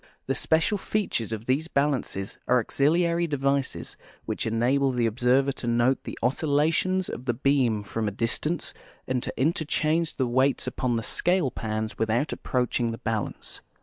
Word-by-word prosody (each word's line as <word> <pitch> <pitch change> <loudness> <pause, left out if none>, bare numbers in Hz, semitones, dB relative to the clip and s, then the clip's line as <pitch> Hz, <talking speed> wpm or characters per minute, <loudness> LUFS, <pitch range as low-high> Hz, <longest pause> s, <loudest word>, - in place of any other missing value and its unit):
The 135 - 0
special 165 +9 +1
features 190 - -1
of 110 0 -4
these 135 +6 +1
balances 140 - -1
are 125 - +4
auxiliary 170 +7 +2
devices 140 -2 -1 0.3
which - - -2
enable 125 +5 +2
the 120 -2 +1
observer 125 +4 +2
to 130 - -6
note 120 +3 +2
the - - -6
oscillations 160 +7 +1
of 125 - -7
the 120 - +1
beam 125 -5 +2
from 110 +1 -3
a - - 0
distance 120 - -1 0.3
and 130 -1 0
to - - -3
inter 155 +4 +2
change 160 +2 +1
the 130 - +1
weights 130 +3 +2
uiion 125 -2 -1
the 115 - -3
scale 175 -2 +1
pans 110 -1 -4
without 115 +6 +1
approaching 125 -1 -1
the 115 0 -3
balance. 110 -2 -4
130 Hz, 160 wpm, -26 LUFS, 115-150 Hz, 0.3 s, are